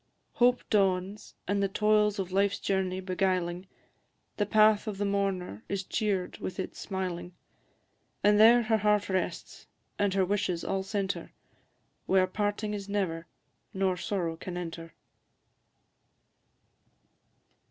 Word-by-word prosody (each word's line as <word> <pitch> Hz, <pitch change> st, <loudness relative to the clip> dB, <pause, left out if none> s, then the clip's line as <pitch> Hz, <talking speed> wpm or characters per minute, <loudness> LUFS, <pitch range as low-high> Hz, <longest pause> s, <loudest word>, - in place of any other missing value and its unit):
Hope 245 Hz, 0 st, +3 dB
dawns 195 Hz, 0 st, 0 dB
and 200 Hz, +1 st, +1 dB
the 200 Hz, -, +2 dB
toils 210 Hz, +1 st, +2 dB
of 190 Hz, -2 st, -3 dB
life's 200 Hz, +1 st, +2 dB
journey 190 Hz, -1 st, -1 dB
beguiling, 185 Hz, -1 st, -1 dB, 0.7 s
The 205 Hz, -, 0 dB
path 215 Hz, 0 st, +4 dB
of 210 Hz, -2 st, -3 dB
the 205 Hz, -, -1 dB
mourner 195 Hz, -, -2 dB
is 195 Hz, -1 st, -2 dB
cheer'd 195 Hz, -3 st, -2 dB
with 185 Hz, -, -5 dB
its 190 Hz, -, -5 dB
smiling; 185 Hz, -2 st, -4 dB, 0.9 s
And 210 Hz, 0 st, +5 dB
there 235 Hz, +2 st, +7 dB
her 220 Hz, 0 st, +2 dB
heart 210 Hz, -1 st, +2 dB
rests, 185 Hz, -2 st, -3 dB, 0.3 s
and 200 Hz, -2 st, +1 dB
her 190 Hz, -1 st, +3 dB
wishes 190 Hz, -3 st, -1 dB
all 195 Hz, 0 st, -1 dB
centre, 195 Hz, 0 st, -3 dB, 0.7 s
Where 190 Hz, 0 st, +4 dB
parting 205 Hz, +2 st, -2 dB
is 200 Hz, -1 st, -6 dB
never 170 Hz, -5 st, -2 dB, 0.5 s
nor 190 Hz, -1 st, +1 dB
sorrow 180 Hz, -3 st, -2 dB
can 175 Hz, +1 st, -6 dB
enter. 165 Hz, -1 st, -7 dB
195 Hz, 125 wpm, -29 LUFS, 185-205 Hz, 0.9 s, there